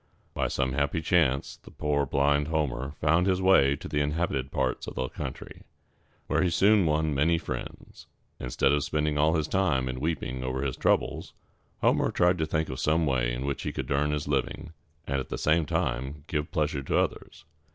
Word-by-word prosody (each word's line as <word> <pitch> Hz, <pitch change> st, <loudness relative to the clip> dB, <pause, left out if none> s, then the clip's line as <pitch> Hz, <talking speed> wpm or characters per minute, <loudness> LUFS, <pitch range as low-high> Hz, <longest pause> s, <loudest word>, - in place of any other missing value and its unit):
By -, -, 0 dB
some 65 Hz, -1 st, -1 dB
happy 70 Hz, +3 st, 0 dB
chance, 80 Hz, -5 st, +1 dB, 0.2 s
poor 70 Hz, -1 st, 0 dB
blind 70 Hz, +2 st, +2 dB
Homer 75 Hz, -3 st, -2 dB
found 80 Hz, +5 st, +3 dB
his 95 Hz, -1 st, +2 dB
way 95 Hz, -8 st, +5 dB
to -, -, -8 dB
the 75 Hz, -, -1 dB
inhabited 75 Hz, -3 st, -1 dB
parts 65 Hz, -2 st, -1 dB
of -, -, -7 dB
the 65 Hz, -, -1 dB
country, -, -, -7 dB, 0.6 s
where -, -, +1 dB
he 90 Hz, -, +2 dB
soon 100 Hz, +1 st, +4 dB
won 75 Hz, 0 st, +1 dB
many 80 Hz, +4 st, +2 dB
friends. 80 Hz, -, -7 dB, 0.3 s
Instead 65 Hz, +2 st, +1 dB
of 75 Hz, 0 st, +2 dB
spending 75 Hz, -1 st, -1 dB
all 80 Hz, +2 st, +3 dB
his 80 Hz, -1 st, 0 dB
time 85 Hz, -10 st, +1 dB
in 65 Hz, 0 st, -4 dB
weeping 65 Hz, -4 st, -3 dB
over 65 Hz, +1 st, -2 dB
his 65 Hz, -3 st, -2 dB
troubles, -, -, 0 dB, 0.5 s
Homer -, -, +3 dB
tried 90 Hz, 0 st, +2 dB
to 80 Hz, -, 0 dB
think 80 Hz, 0 st, -1 dB
of 65 Hz, -, -5 dB
some 80 Hz, +2 st, +2 dB
way 65 Hz, -4 st, +1 dB
in 60 Hz, +3 st, -3 dB
which 70 Hz, 0 st, -2 dB
he -, -, -3 dB
could -, -, -5 dB
earn 70 Hz, +2 st, +2 dB
his 75 Hz, -1 st, -2 dB
living, 75 Hz, +3 st, -2 dB, 0.3 s
and 70 Hz, -2 st, -1 dB
at 65 Hz, -, -6 dB
the -, -, -3 dB
same 80 Hz, 0 st, +2 dB
time 70 Hz, +4 st, -2 dB
give 75 Hz, 0 st, -2 dB
pleasure 75 Hz, -5 st, -1 dB
to 70 Hz, -, -1 dB
others. -, -, -2 dB
75 Hz, 195 wpm, -27 LUFS, 70-80 Hz, 0.6 s, way